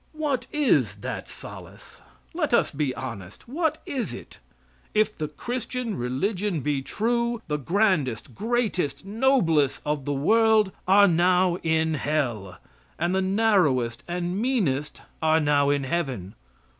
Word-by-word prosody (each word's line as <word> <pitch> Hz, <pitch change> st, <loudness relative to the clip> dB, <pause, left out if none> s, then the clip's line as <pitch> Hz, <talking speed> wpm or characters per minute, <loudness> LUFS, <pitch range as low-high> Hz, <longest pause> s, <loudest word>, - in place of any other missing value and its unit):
What 285 Hz, -6 st, -2 dB
is 295 Hz, -3 st, +2 dB
that -, -, -5 dB
solace? -, -, -11 dB, 0.3 s
Let 305 Hz, -7 st, +1 dB
us -, -, +2 dB
be 145 Hz, -2 st, -1 dB
honest. 105 Hz, -, -8 dB
What 315 Hz, +4 st, -1 dB
is 260 Hz, -4 st, -3 dB
it? -, -, -12 dB, 0.6 s
If 215 Hz, 0 st, +2 dB
the 155 Hz, -, -3 dB
Christian 245 Hz, -, -4 dB
religion 175 Hz, -, -1 dB
be 145 Hz, 0 st, -1 dB
true, 235 Hz, -, -1 dB
the 150 Hz, -2 st, -1 dB
grandest, 150 Hz, -, 0 dB
greatest, 215 Hz, -, -1 dB
noblest 195 Hz, -, +2 dB
of 150 Hz, -2 st, -2 dB
the 145 Hz, -, -1 dB
world 215 Hz, +7 st, +3 dB, 0.2 s
are 200 Hz, +2 st, +7 dB
now 180 Hz, +1 st, +3 dB
in 160 Hz, -1 st, +1 dB
hell, 130 Hz, -11 st, -2 dB, 0.4 s
and 175 Hz, +3 st, 0 dB
the 190 Hz, -, +2 dB
narrowest 185 Hz, -, +2 dB
and 175 Hz, +3 st, -2 dB
meanest 170 Hz, -, -1 dB, 0.2 s
are 160 Hz, 0 st, +4 dB
now 145 Hz, -2 st, +3 dB
in 145 Hz, -1 st, +1 dB
heaven. 130 Hz, -, -3 dB
175 Hz, 130 wpm, -25 LUFS, 145-225 Hz, 0.6 s, are